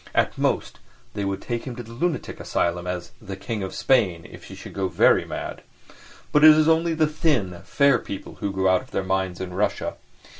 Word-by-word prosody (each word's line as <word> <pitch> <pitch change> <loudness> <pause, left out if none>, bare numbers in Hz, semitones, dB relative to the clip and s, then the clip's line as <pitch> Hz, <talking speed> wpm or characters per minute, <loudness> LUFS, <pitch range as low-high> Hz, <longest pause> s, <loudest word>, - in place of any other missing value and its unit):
At - - +2
most, - - -1 0.3
they 105 - -3
would 100 0 -3
take 120 -1 -3
him 125 - -5
to 120 - -7
the 115 - -13
lunatic 160 +8 -2
asylum 85 +1 -1
as 90 -1 -4
"the 95 - -6
King 105 +3 -4
of 95 -1 -5
Spain" 100 -11 +2
if - - -13
he - - -10
should - - -10
go 95 -1 -1
very 90 - +4
mad. - - -6 0.7
But 150 - +4
it 155 0 +10
is 155 0 +4
only 165 0 +3
the 155 0 +3
thin, 145 - 0
fair 140 -4 +3
people 100 - -8
who 100 - -2
go 95 0 0
out 95 -1 +4
of - - -16
their 95 - -2
minds 95 -1 -1
in 90 -1 -5
Russia. 100 +3 -1
100 Hz, 215 wpm, -24 LUFS, 95-140 Hz, 0.7 s, it